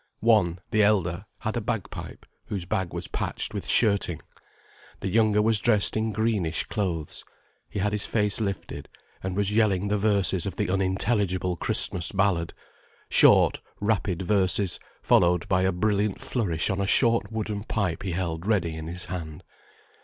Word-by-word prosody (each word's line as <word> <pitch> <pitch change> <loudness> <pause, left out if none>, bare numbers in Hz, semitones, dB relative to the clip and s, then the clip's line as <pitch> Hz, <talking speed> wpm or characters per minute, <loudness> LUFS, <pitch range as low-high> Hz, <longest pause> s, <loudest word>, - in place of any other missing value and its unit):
One, 105 -7 +3
the 110 - +3
elder, 95 -3 +1 0.2
had 110 0 -2
a 120 - -1
bagpipe 115 -2 -5 0.2
whose 95 -4 -4
bag 95 0 -2
was - - -5
patched - - -3
with - - -5
shirting: 100 -7 +2 0.8
the 95 - -3
younger 105 0 +3
was 110 -1 +3
dressed 105 -1 +2
in 110 0 0
greenish 105 -6 0
clothes, 85 -7 -3 0.5
he - - -7
had 105 +1 0
his 105 - -3
face 105 -1 0
lifted, 100 -3 -4 0.3
and 95 -1 -4
was 100 0 0
yelling 105 -3 +2
the 105 0 +1
verses 100 -3 +1
of 95 - -5
the - - -1
unintelligible 95 -1 0
Christmas 85 0 +1
ballad: 95 -4 0 0.5
short, - - +5 0.2
rapid 100 -4 0
verses, 95 0 +2 0.2
followed 85 -1 +3
by 95 -1 +2
a 95 +1 +2
brilliant 100 +2 0
flourish 95 -11 -1
on 95 +1 -1
a 100 - -1
short 115 -2 +3
wooden 105 -2 -3
pipe 100 -7 -2
he 95 -2 -3
held 85 0 -3
ready 90 -7 +1
in 80 0 -6
his 90 +2 -5
hand. 85 -1 -6
100 Hz, 160 wpm, -26 LUFS, 90-105 Hz, 0.8 s, short